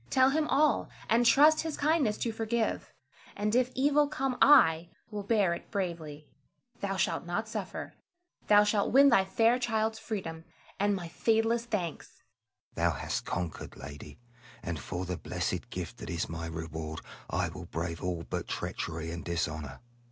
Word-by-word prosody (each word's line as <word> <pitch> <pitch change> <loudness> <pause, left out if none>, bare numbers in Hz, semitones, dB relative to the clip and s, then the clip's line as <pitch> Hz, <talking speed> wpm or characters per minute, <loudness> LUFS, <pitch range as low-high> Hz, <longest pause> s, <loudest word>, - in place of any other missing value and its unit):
Tell 260 0 +4
him 305 +1 +1
all, 295 +2 +2 0.2
and 235 +1 +4
trust 300 +6 +6
his 320 -2 -4
kindness 285 -8 +2
to 230 - 0
forgive; 225 0 -2 0.4
and 210 +1 -1
if 250 +1 +3
evil 290 +2 +3
come 270 -3 -2
I 170 - +6 0.2
will 210 -1 -3
bear 200 -4 +2
it 170 - -8
bravely, 165 -6 -4 0.5
thou 195 -1 -2
shalt 175 -1 0
not 175 +6 -2
suffer. 220 - -5 0.5
Thou 205 0 +7
shalt 210 -1 +1
win 275 +2 +7
thy 195 -7 +4
fair 225 +5 +3
child's 220 -2 0
freedom, 165 -8 -5 0.4
and 205 0 +2
my 175 -3 -5
fadeless 225 +5 +1
thanks. 185 -9 -4 0.5
Selim. - - +2
Thou - - -2
hast - - -3
conquered, 90 -3 -4
lady; 70 +1 -10 0.5
and 85 -3 -3
for 90 +4 -4
the 90 -1 -3
blessed - - -3
gift 90 +5 -6
that 105 - -8
is 85 -2 -2
my 80 0 -5
reward, 80 -1 -5 0.3
I - - 0
will - - -9
brave 85 +1 -4
all 90 -2 -2
but - - -4
treachery 80 0 -4
and 85 0 -6
dishonor. 75 -5 -3
200 Hz, 165 wpm, -30 LUFS, -, 0.5 s, Thou